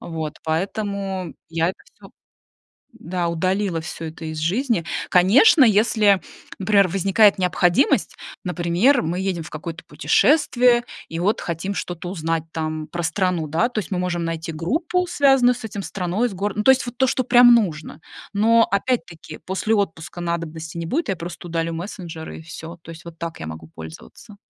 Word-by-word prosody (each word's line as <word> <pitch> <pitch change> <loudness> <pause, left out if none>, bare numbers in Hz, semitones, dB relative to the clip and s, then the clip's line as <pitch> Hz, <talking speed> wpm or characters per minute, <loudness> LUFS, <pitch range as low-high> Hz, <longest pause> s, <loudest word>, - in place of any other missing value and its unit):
Вот, 160 -3 -5
поэтому 190 +1 -3
я 165 0 0
это - - -14 0.2
всё - - -16 0.9
да, 180 -5 -3
удалила 185 +1 -1
всё 165 0 -7
это 160 +1 -8
из 155 0 -5
жизни. 195 - 0 0.2
Конечно, 245 - +6
если, 210 -2 +4 0.4
например, 200 0 +4
возникает 195 +3 +3
необходимость, 185 +7 +2 0.3
например, 180 +9 +2
мы 170 +3 -2
едем 190 -3 -2
в 160 - -10
какое-то 165 +1 -7
путешествие 250 -5 +3 0.2
и 165 - -5
вот 195 +5 +1
хотим 175 +4 -4
что-то 175 -2 -5
узнать 165 -3 -2
там 155 -1 -3
про 175 +2 -5
страну. 175 -3 0
Да, 165 +10 +1
то 235 -3 -2
есть 200 - -9
мы 185 - -1
можем 175 -2 -2
найти 165 +1 -4
группу, 320 - -1
связанную 270 -6 +4
с - - -11
этим 205 -2 -5
страной, 195 +6 -1
с 200 - -9
гор 200 +2 -2
Ну, 210 - -1
то 265 - +6
есть 265 -2 +3
вот 245 - -7
то, 265 -1 +2
что 255 - 0
прямо 245 0 +7
нужно! 180 -13 +1 0.3
Но 230 +3 +4
опять-таки 195 -7 -2
после 190 +6 -1
отпуска 175 -3 -3
надобности 165 -1 -4
не 165 - -4
будет, 300 - -1
я 195 - 0
просто 175 +1 -8
удалю 165 0 -2
мессенджеры, 170 -2 -7
и - - -11
всё. 165 +1 -9
То 165 - -10
есть 165 0 -13
вот 170 -1 -11
так 170 -1 -6
я 80 - -5
могу 80 0 -8
пользоваться. 80 - -11
180 Hz, 175 wpm, -22 LUFS, 165-215 Hz, 0.9 s, прямо